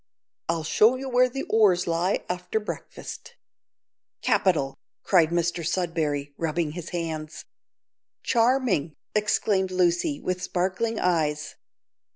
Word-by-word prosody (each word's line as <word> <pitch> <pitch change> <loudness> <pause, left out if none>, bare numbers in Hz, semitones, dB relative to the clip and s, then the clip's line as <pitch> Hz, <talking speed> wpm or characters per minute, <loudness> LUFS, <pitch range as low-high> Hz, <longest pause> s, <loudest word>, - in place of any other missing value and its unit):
I'll 165 -1 0
show 215 +9 +4
you 265 +1 -5
where 250 0 +4
the 270 +2 -4
oars 200 -5 +3
lie 170 +3 0
after 180 +4 -2
breakfast." 210 - -8 0.9
"Capital," 140 -8 +2 0.3
cried 170 -5 +4
Mr 170 0 0
Sudberry, 155 -5 -1
rubbing 165 -1 -1
his 170 +1 -7
hands. 160 -3 -5 0.8
"Charming," 230 - +2 0.2
exclaimed 210 -2 +1
Lucy, 185 - +1
with 185 0 -3
sparkling 190 +6 -1
eyes. 155 -4 0
180 Hz, 110 wpm, -26 LUFS, 165-210 Hz, 0.9 s, show